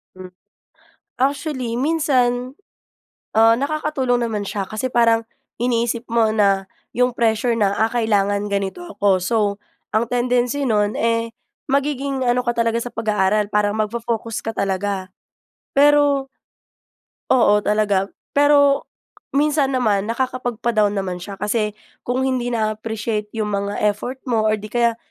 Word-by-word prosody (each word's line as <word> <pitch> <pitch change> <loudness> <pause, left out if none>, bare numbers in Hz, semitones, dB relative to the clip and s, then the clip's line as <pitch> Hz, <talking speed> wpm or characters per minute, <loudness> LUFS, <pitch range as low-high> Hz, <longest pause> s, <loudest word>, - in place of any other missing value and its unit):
Hmm. 185 -1 -11 0.9
Actually 265 -3 -1
minsan, 260 -4 +1 0.8
ah, 225 +1 +6
nakakatulong 275 -4 0
naman 215 -3 -3
siya 195 -1 -3
kasi 215 +6 -3
parang 230 -1 +3 0.4
iniisip 235 -1 0
mo 230 -2 +3
na 195 -2 +2 0.3
yung 250 0 +2
pressure 230 0 +1
na, 200 -2 +2
ah, 220 +1 +2
kailangan 205 -3 +1
ganito 200 - -2
ako, 200 - +1
so 225 +5 0 0.6
ang 220 +2 +2
tendency 245 +2 +1
nun, 210 -3 +1
eh, 230 0 0 0.4
magiging 275 -1 0
ano 245 +1 +2
ka 240 - +1
talaga 230 0 +1
sa 245 - -6
pag-aaral, 210 -2 +1
parang 210 0 +2
magfo-focus 230 +1 -2
ka 225 - -3
talaga. 195 0 -2 0.7
Pero 285 -1 +4 1.0
Oo 210 -5 +4
talaga. 205 -2 +1 0.2
Pero 285 -1 +4 0.5
minsan 295 -2 +2
naman 215 -6 +1
nakakapagpa-down 235 -4 0
naman 185 -2 -3
siya 195 +1 -8
kasi 210 0 -1 0.2
kung 255 +2 -1
hindi 255 -2 -1
naa-appreciate 215 -1 -2
'yong 215 - 0
mga 200 0 -1
effort 210 +5 -1
mo, 220 -4 +1
or 215 - +1
'di 210 - -9
kaya 235 -1 +2
230 Hz, 130 wpm, -20 LUFS, 210-255 Hz, 1.0 s, ah